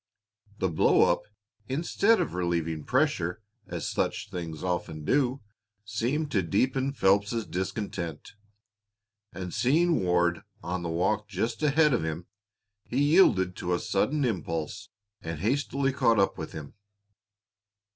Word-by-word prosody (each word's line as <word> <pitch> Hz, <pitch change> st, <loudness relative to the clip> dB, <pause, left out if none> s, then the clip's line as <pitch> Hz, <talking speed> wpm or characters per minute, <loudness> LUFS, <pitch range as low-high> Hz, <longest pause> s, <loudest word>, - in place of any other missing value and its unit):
The 95 Hz, -, +1 dB
blow 85 Hz, 0 st, +4 dB
up, 85 Hz, 0 st, -1 dB, 0.5 s
instead 175 Hz, +10 st, +2 dB
of -, -, -1 dB
relieving 85 Hz, -3 st, -1 dB
pressure, 125 Hz, -, +1 dB, 0.3 s
as -, -, -4 dB
such -, -, -2 dB
things 80 Hz, -3 st, -5 dB
often 85 Hz, -4 st, -3 dB
do, 130 Hz, -, +1 dB, 0.4 s
seemed 125 Hz, +9 st, -1 dB
to 100 Hz, -, +2 dB
deepen 130 Hz, +9 st, +1 dB
Phelps's 105 Hz, -1 st, +2 dB
discontent, 90 Hz, -4 st, -4 dB, 1.0 s
and 90 Hz, -2 st, -6 dB
seeing 160 Hz, -, +2 dB
Ward 85 Hz, -1 st, +2 dB, 0.2 s
on 90 Hz, +2 st, -3 dB
the 85 Hz, -, -3 dB
walk 105 Hz, +5 st, 0 dB
just 105 Hz, -, -2 dB
ahead 150 Hz, 0 st, +4 dB
of 120 Hz, -, +1 dB
him, 80 Hz, +2 st, -4 dB, 0.6 s
he 125 Hz, -, -5 dB
yielded 140 Hz, -, +4 dB
to 90 Hz, 0 st, -1 dB
a -, -, -2 dB
sudden 140 Hz, +8 st, 0 dB
impulse 95 Hz, -2 st, -3 dB, 0.3 s
and 80 Hz, -2 st, -5 dB
hastily 135 Hz, +4 st, 0 dB
caught 120 Hz, -5 st, +3 dB
up 100 Hz, -1 st, +2 dB
with 80 Hz, -3 st, -6 dB
him. 75 Hz, -3 st, -8 dB
100 Hz, 130 wpm, -28 LUFS, 85-130 Hz, 1.0 s, blow